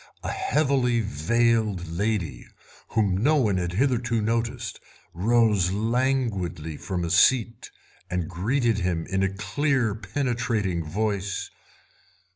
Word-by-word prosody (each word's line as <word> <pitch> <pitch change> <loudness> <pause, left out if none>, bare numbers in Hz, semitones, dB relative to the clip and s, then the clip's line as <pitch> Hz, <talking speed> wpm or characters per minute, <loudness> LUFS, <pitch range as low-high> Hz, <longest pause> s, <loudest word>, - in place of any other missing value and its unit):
A - - -2
heavily 140 - +1
veiled 105 +1 +1
lady, 95 0 -2 0.4
whom 100 -4 +1
no 150 +6 +4
one 110 -10 +2
had 90 -1 -2
hitherto 120 0 +1
noticed, 115 0 -2 0.3
rose 105 -2 +3
languidly 110 - -1
from 90 +2 -3
a 85 - -3
seat 115 +6 +3 0.4
and 90 -2 -2
greeted 115 - 0
him 90 -3 -1
in 95 0 -1
a 95 - +2
clear, 125 +3 0
penetrating 110 -4 -1
voice. 100 +3 -2
110 Hz, 110 wpm, -25 LUFS, 90-120 Hz, 0.4 s, no